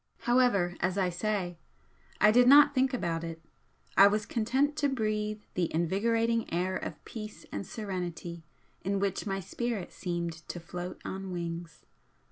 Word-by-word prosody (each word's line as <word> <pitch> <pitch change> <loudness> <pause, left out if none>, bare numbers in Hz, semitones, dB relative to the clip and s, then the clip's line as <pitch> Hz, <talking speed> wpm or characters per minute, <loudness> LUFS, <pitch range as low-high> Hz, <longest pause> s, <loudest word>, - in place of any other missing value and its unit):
However, 240 -8 +3
as 185 +2 0
I 185 -2 +2
say, 180 -2 -2 0.6
I 210 - +7
did 245 +2 +6
not 285 +2 +8
think 260 -1 +3
about 170 -10 -1
it, 165 -1 -5 0.6
I 195 - +9
was 210 +1 +1
content 265 +7 +1
to 290 -1 +2
breathe 215 -4 -1
the 175 -2 0
invigorating 225 +7 +1
air 180 +2 0
of - - -6
peace 215 -2 -8
and - - -3
serenity 175 -5 -5 0.4
in 195 +1 0
which 195 +1 -1
my 195 -1 -1
spirit 225 +1 -3
seemed 170 -2 -3
to 175 - -5
float 175 +2 -6
on 190 0 -5
wings. 170 -2 -5
195 Hz, 150 wpm, -30 LUFS, 175-230 Hz, 0.6 s, I